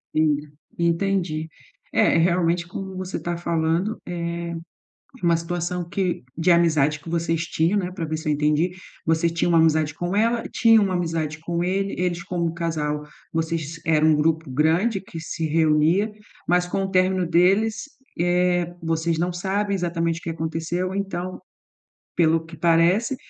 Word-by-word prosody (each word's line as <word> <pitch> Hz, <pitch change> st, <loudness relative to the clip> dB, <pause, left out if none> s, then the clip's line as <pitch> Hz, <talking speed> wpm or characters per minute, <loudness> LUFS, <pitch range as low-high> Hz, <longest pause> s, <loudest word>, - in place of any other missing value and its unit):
Sim, 155 Hz, -2 st, +3 dB, 0.4 s
entendi, 170 Hz, -2 st, 0 dB, 0.4 s
é, -, -, +3 dB
realmente 170 Hz, 0 st, +2 dB
como 190 Hz, +2 st, -6 dB
você 185 Hz, 0 st, -4 dB
está 175 Hz, 0 st, -3 dB
falando, 170 Hz, +4 st, 0 dB
é 170 Hz, -1 st, -4 dB, 0.7 s
uma 170 Hz, -1 st, +4 dB
situação 175 Hz, +1 st, -3 dB
que 185 Hz, -1 st, -1 dB
de 165 Hz, +3 st, +2 dB
amizade 155 Hz, -4 st, +3 dB
que 155 Hz, -, -12 dB
vocês 165 Hz, 0 st, 0 dB
tinham, 170 Hz, +5 st, +1 dB
né, 180 Hz, -2 st, -2 dB
para 175 Hz, -2 st, -5 dB
ver 155 Hz, 0 st, -3 dB
se 155 Hz, -1 st, -5 dB
eu -, -, +3 dB
entendi. 150 Hz, +4 st, +1 dB, 0.3 s
Vocês 165 Hz, +1 st, +2 dB
tinham 170 Hz, +1 st, 0 dB
uma 165 Hz, -, +5 dB
amizade 155 Hz, -2 st, +3 dB
com 175 Hz, +4 st, -3 dB
ela, 230 Hz, +3 st, +2 dB
tinha 225 Hz, -2 st, +5 dB
uma 195 Hz, -2 st, 0 dB
amizade 165 Hz, -3 st, -2 dB
com 170 Hz, +2 st, -2 dB
ele, 195 Hz, +2 st, -1 dB
eles 175 Hz, -1 st, -1 dB
como 170 Hz, -2 st, -2 dB
casal, 155 Hz, -3 st, -2 dB, 0.3 s
vocês 165 Hz, -1 st, -2 dB
eram 155 Hz, -1 st, +4 dB
um 155 Hz, -, +5 dB
grupo 160 Hz, 0 st, 0 dB
grande 165 Hz, -, +2 dB
que 175 Hz, -3 st, -9 dB
se 160 Hz, 0 st, -3 dB
reunia, 160 Hz, +6 st, +2 dB, 0.3 s
mas 180 Hz, +1 st, +2 dB
com 195 Hz, +2 st, -1 dB
o 190 Hz, -, -3 dB
término 185 Hz, -1 st, +2 dB
deles, 195 Hz, -, +2 dB, 0.3 s
eh, 175 Hz, 0 st, +1 dB
vocês 165 Hz, 0 st, 0 dB
não 175 Hz, +1 st, 0 dB
sabem 200 Hz, +3 st, -1 dB
exatamente 170 Hz, -2 st, -1 dB
o -, -, -22 dB
que 165 Hz, -, -4 dB
aconteceu. 165 Hz, +3 st, -3 dB
Então, 185 Hz, -2 st, -4 dB, 0.8 s
pelo 165 Hz, -1 st, +3 dB
que 165 Hz, 0 st, -11 dB
parece, 170 Hz, -, +3 dB
170 Hz, 160 wpm, -23 LUFS, 160-180 Hz, 0.8 s, uma